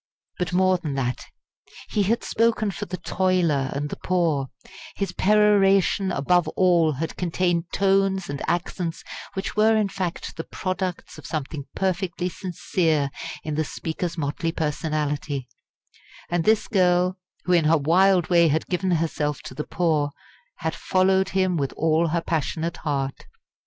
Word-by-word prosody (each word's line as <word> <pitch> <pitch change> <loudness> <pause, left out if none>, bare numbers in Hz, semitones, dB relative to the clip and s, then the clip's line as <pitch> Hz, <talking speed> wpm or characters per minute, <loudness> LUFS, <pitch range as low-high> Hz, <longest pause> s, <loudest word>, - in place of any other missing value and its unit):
But 180 -2 -1
more 185 0 +3
than 150 -5 -4
that. 125 -2 -2 0.6
He 210 - +1
had 215 +4 +1
spoken 220 -2 +1
for - - -6
the 180 +2 -4
toiler 175 -6 +1
and 145 +1 -3
the - - -4
poor; 165 -7 +1 0.5
his 195 - -2
peroration 195 -2 +3
above 175 +4 +2
all 170 -4 +4
had 160 +4 -4
contained 175 -1 0
tones 195 -1 +2
and 140 0 -5
accents 170 0 -2 0.3
which 190 0 -3
were 220 +1 +4
in 210 -2 +1
fact 185 -3 -4
the 165 - -3
products 185 0 -4
of - - -10
something 150 -2 -4
perfectly 185 -1 -1
sincere 165 -5 -1 0.3
in 155 - -3
the 155 +1 +1
speaker's 165 +3 -4
motley 155 +2 -2
personality; 150 -3 -2 0.8
and 175 -2 +1
this 220 0 +3
girl, 185 -2 +2 0.2
who 180 - +1
in 170 -3 +4
her 160 +2 +5
wild 180 +4 +3
way 170 -2 +5
had 155 +1 +1
given 185 +1 -1
herself 155 -4 -1
to - - -8
the 150 +3 -5
poor, 155 -4 +1 0.5
had 160 0 -1
followed 190 +2 +2
him 185 -2 +1
with 140 -3 -1
all 160 +1 +2
her 170 +1 0
passionate 165 +1 -2
heart. 135 -3 -3
175 Hz, 150 wpm, -24 LUFS, 155-185 Hz, 0.8 s, her